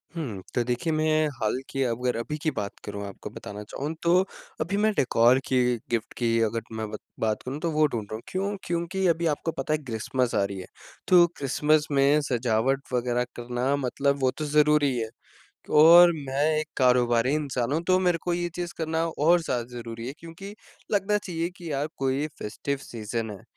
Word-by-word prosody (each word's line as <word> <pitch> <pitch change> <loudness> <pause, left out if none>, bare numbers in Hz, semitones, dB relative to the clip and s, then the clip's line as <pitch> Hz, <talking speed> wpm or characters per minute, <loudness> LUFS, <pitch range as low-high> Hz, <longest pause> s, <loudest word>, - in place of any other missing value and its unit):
हुँ, 115 - -4
तो 120 - +2
देखिए 125 +7 -1
मैं 155 0 +2
हाल 110 +3 +1
की 135 - -2
अगर 125 0 -1
अभी 150 +6 -3
की 155 - +2
बात 100 -1 -4
करूँ 100 -1 -5
आपको 100 - -8
बताना 105 +1 -8
चाहूँ 145 +8 -5
तो 170 +2 +4 0.4
अभी 190 +6 -1
मैं 215 +1 +3
डेकोर 125 0 +4
की 130 - +2 0.3
गिफ्ट 115 -2 -1
की 115 -1 +1
अगर 115 +1 0
मैं 110 -1 -4
बत 105 - -5 0.2
बात 110 -1 0
करूँ 135 +4 -5
तो, 170 0 -1
वो 155 0 +3
ढूँढ 115 -6 -3
रहा - - -2
हूँ। 110 - -7
क्यों? 195 +2 -2
क्योंकि 175 +3 -2
अभी 170 0 +1
आपको 165 +3 -3
पता 145 +2 -2
है - - +2
क्रिसमस 120 +1 -1
आ 100 - +3
रही 100 -1 -4
है, 90 - -8 0.4
तो 180 -2 +7
क्रिसमस 150 +2 +2
में 140 +2 +4
सजावट 125 +2 +1
वगैरह 125 0 +1
करना 120 +3 -1
मतलब 140 +1 0
वो 130 -1 +3
तो 155 - -2
ज़रूरी 150 0 +4
ही 125 - -2
है 110 -1 -3 0.7
और 170 +2 +9 0.2
मैं 135 +2 0 0.2
एक 155 - -4
कारोबारी 125 -1 +3
इंसान 135 -4 -1
हूँ, 160 - +1
तो 185 +1 +3
मेरे 180 -2 +2
को 175 - 0
ये 175 0 -1
चीज़ 175 -1 -4
करना 160 0 0
और 165 +2 +3
ज़्यादा 125 -7 -1
ज़रूरी 115 0 -6
है 135 - -5
क्योंकि 195 +5 -10 0.4
लगना 210 0 +2
चाहिए 170 -3 -3
कि 170 -4 -7
यार 145 +2 -1
कोई 135 +3 0
फेस्टिव 140 +6 -3
सीज़न 115 0 -4
है। 100 - -10
140 Hz, 200 wpm, -26 LUFS, 120-165 Hz, 0.7 s, और